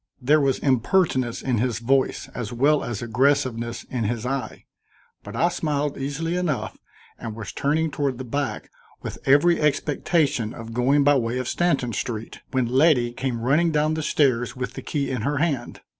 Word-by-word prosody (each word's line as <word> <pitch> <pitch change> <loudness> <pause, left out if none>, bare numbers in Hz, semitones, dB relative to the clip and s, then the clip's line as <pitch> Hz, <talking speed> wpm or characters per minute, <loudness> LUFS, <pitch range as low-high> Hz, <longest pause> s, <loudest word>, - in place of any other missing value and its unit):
There 145 +4 +3
was 135 -2 +2
impertinence 130 - +1
in 125 -4 0
his 125 0 0
voice 130 +3 +1
as 120 -3 -5
well 140 +5 +2
as 120 -2 -4
aggressiveness 120 -1 0
in 120 -4 -3
his 115 +2 -2
eye, 135 0 -4 0.6
but 105 +2 -9
I 170 +8 +3
smiled 150 -4 -1
easily 145 +5 -3
enough 175 -6 -2 0.4
and 115 -2 -6
was 110 -4 -6
turning 155 +3 0
toward 140 -5 -1
the 130 - -5
back 140 +3 -3 0.3
with - - -6
every 155 +6 +5
expectation 145 -4 +1
of 115 -1 -8
going 135 +4 +3
by 145 0 +5
way 120 0 -1
of 130 -1 -3
Stanton 140 -9 0
Street, 115 0 -4
when 130 -2 +1
Letty 130 -1 +3
came 125 -2 -3
running 150 +8 +3
down 155 0 +1
the 160 - -2
stairs 130 -6 +1
with 125 -1 -4
the - - -7
key 140 -3 -2
in 125 -4 -2
her 145 +5 -1
hand. 150 -3 -2
135 Hz, 175 wpm, -24 LUFS, 120-150 Hz, 0.6 s, every